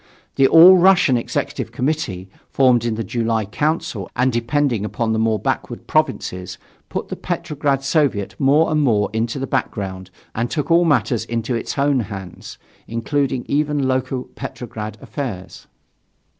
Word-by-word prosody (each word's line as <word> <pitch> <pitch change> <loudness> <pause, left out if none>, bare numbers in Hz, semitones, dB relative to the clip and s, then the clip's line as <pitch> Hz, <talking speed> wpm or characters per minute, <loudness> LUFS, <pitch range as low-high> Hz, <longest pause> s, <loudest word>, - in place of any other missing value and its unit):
The 135 -1 +4
All 175 +5 +9
Russian 180 -7 +5
Executive 120 - -3
Committee, 125 - -2 0.2
formed 125 -3 +3
in 115 -2 0
the 115 - -3
July 115 0 -1
Council 115 - -2
and 125 0 +1
depending 120 -1 0
upon 110 +2 -1
the 110 - 0
more 110 -1 +2
backward - - -3
provinces, 90 +1 -1 0.3
put - - -4
the - - -4
Petrograd 150 -6 -2
Soviet 140 - +1
more 145 +4 +3
and 155 -1 +2
more 105 -8 +2
into 115 +3 -1
the 135 - -2
background 95 -8 -3 0.2
and 120 +2 -2
took 150 +2 -2
all 170 +1 +5
matters 120 -7 +1
into 115 +1 -2
its 115 - -3
own 140 -1 +2
hands, 95 -5 -7 0.3
including 130 +2 -1
even 145 -1 0
local 130 0 -1
Petrograd 110 -3 -7
affairs. 115 -11 -6
125 Hz, 145 wpm, -20 LUFS, 110-145 Hz, 0.3 s, All